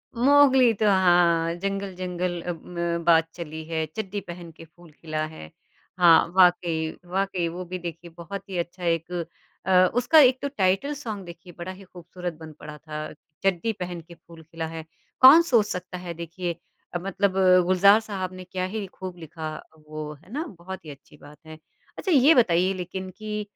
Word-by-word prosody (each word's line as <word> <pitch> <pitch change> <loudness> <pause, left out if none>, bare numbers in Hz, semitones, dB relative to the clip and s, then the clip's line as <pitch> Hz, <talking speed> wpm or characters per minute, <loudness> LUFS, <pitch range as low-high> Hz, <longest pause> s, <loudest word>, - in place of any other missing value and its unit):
Mowgli 265 -1 +5
तो 215 +1 -1
हाँ 175 -3 +3
जंगल-जंगल 185 -3 -3
अब 170 -2 -4
म 170 -1 -3
बात 165 -1 +5
चली 160 -2 -7
है, 160 -1 -2
चड्डी 205 -2 -4
पहन 170 -1 -9
के 165 - -11
फूल 170 0 -19
खिला 155 0 -4
है। 155 - -10 0.5
हाँ, 165 -2 +6
वाक़ई 175 -3 +3 0.2
वाक़ई 185 -1 -1
वो 180 +2 -7
भी 180 +1 -6
देखिए 170 0 -8
बहुत 195 +4 -8
ही 185 - -4
अच्छा 175 +1 -5
एक 165 +1 -1 0.5
अ, 190 - -1 0.2
उसका 250 +6 +5
एक 260 -2 +6
तो 285 - -1
टाइटल 195 +10 +1
सॉन्ग 220 -9 -6
देखिए 175 +1 -12
बड़ा 175 +2 -6
ही 190 +1 -12
खूबसूरत 175 -1 -8
बन 160 -1 -10
पड़ा 150 0 -9
था। 155 0 -7 0.3
चड्डी 195 +3 +1
पहन 175 -1 -5
के 170 +1 -15
फूल 165 -1 -16
खिला 165 +1 -6
है। 160 0 -8 0.4
कौन 280 +6 +10
सोच 235 -10 +3
सकता 180 -1 -6
है 175 -1 -6
देखिए 170 +1 -5 0.5
मतलब 195 0 0 0.3
गुलजार 200 +3 +5
साहब 190 -4 -5
ने 185 0 -9
क्या 185 0 -4
ही 205 +1 -4
खूब 185 -1 -8
लिखा 160 -1 -7 0.3
वो, 155 0 -6
है 165 +8 -19
ना? 310 +4 -2
बहुत 190 -1 -10
ही - - -9
अच्छी 140 +1 -16
बात 150 +1 -14
है। 155 0 -10 0.4
अच्छा, 375 - -2
ये 290 +2 +6
बताइए 185 -5 +3
लेकिन 185 +1 -6
कि 210 0 -4
180 Hz, 180 wpm, -25 LUFS, 165-195 Hz, 0.5 s, कौन